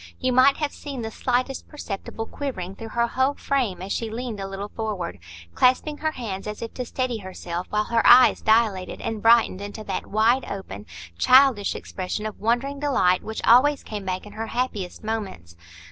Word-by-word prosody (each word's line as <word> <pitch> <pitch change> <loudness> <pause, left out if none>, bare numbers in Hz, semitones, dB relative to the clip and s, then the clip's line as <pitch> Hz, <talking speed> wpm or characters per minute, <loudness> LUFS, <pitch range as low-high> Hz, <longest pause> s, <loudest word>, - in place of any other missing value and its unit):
You 255 -1 0
might 260 +2 +5
have 295 -2 -1
seen 275 -5 -6
the 220 - -4
slightest 255 +3 -1
perceptible 225 -5 -6
quivering 210 -10 -5
through 225 +3 -9
her 235 - +4
whole 260 +4 0
frame 240 -10 -1
as 195 - -6
she 230 - -2
leaned 230 -1 -5
a 195 - -4
little 195 +1 -6
forward, 205 - -4 0.3
clasping 260 - +2
her 315 0 -1
hands 210 -7 -5
as 210 +1 -5
if 230 - -6
to 250 - -4
steady 255 -3 -2
herself; 180 -2 -6
while 210 0 +1
her 230 +1 +1
eyes 250 +1 +7
dilated 220 -4 +2
and 220 -2 -4
brightened 225 -4 +4
into 205 +2 -7
that - - -4
wide 225 +5 +2
open, 105 - -7 0.3
childish 255 -6 +5
expression 190 +3 -5
of 215 - -6
wondering 245 +6 0
delight 220 -11 +2
which 220 0 -6
always 275 +5 +5
came 210 -2 -6
back 185 +1 -3
in 210 - -11
her 225 +1 -4
happiest 225 -8 -3
moments. 200 - -5
225 Hz, 185 wpm, -24 LUFS, 200-255 Hz, 0.3 s, eyes